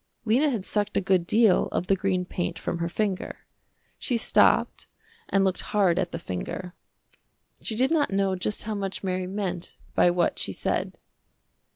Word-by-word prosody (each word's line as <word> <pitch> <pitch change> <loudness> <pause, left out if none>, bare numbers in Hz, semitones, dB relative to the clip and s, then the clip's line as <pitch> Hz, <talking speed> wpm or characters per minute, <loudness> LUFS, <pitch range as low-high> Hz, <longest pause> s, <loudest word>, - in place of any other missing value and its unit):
Lena 255 +7 +3
had 225 -8 -2
sucked 210 -1 0
a - - +5
good 185 -3 +1
deal 220 -4 +4
of - - -2
the 195 - +3
green 185 -2 -1
paint 175 -1 -3
from 170 - -3
her 170 0 -1
finger. 200 0 -3 0.5
She 245 - 0
stopped 230 - +3 0.4
and 195 -1 +3
looked 185 -1 0
hard 190 -4 +2
at 180 -2 -1
the - - -3
finger. 170 - -5 0.9
She 220 - -4
did 260 +5 +2
not 315 -3 +2
know 195 -1 +1
just 195 +3 -2
how 220 - -3
much 195 -1 -4
Mary 185 -1 -2
meant 185 -3 -4 0.2
by 175 - +5
what 175 -1 +1
she - - -3
said. - - -2
190 Hz, 175 wpm, -26 LUFS, 180-210 Hz, 0.9 s, a